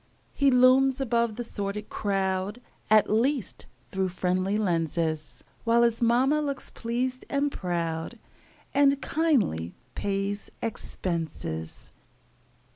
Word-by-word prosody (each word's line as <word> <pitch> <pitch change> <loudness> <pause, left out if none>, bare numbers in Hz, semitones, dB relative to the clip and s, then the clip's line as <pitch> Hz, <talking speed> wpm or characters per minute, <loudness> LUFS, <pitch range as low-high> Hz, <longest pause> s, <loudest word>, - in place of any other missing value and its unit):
He 280 -1 +3
looms 260 +1 +5
above 235 -4 +1
the 240 - -4
sordid 210 -2 -4
crowd, 195 +1 -1 0.3
At 215 0 +6
least 245 +3 0 0.2
through 190 -1 0
friendly 185 +2 0
lenses; 165 -5 -1 0.2
While 235 +1 +4
his 235 0 +2
mama 255 +6 +3
looks 280 -2 -4
pleased 250 +2 -2
and 285 +1 +1
proud, 170 +1 -3 0.6
And 280 0 +4
kindly 250 - +1 0.2
pays 200 0 -2
expenses. 160 - -4
215 Hz, 105 wpm, -27 LUFS, 185-255 Hz, 0.6 s, At